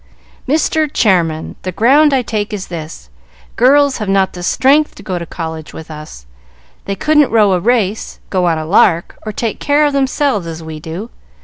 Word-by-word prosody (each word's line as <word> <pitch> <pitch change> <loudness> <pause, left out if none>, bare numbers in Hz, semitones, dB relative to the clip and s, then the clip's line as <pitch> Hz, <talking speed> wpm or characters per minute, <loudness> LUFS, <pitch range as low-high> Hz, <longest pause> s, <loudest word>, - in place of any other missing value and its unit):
"Mr. 310 +1 +1
Chairman, 170 - +1
the 185 - -4
ground 275 - +4
I 265 -2 +1
take 215 -1 -3
is 200 -2 -5
this: 155 - -8 0.4
girls 280 +2 +4
have 210 -2 -3
not 195 -1 +2
the 180 - -8
strength 275 +11 +2
to - - -13
go 185 -3 -3
to 170 - -7
college 160 -2 -7
with 160 0 -9
us. 150 - -10 0.6
They 195 - -3
couldn't 300 +3 +3
row 210 -4 +3
a 180 - +1
race, 220 0 -1
go 185 -2 +1
on 165 -2 +1
a 155 - -4
lark, 170 -1 +2
or - - -2
take 225 0 -3
care 295 +1 +2
of 290 - 0
themselves, 270 - 0
as 165 0 -7
we 160 -1 -7
do. 170 +9 -7
200 Hz, 190 wpm, -15 LUFS, 165-265 Hz, 0.6 s, ground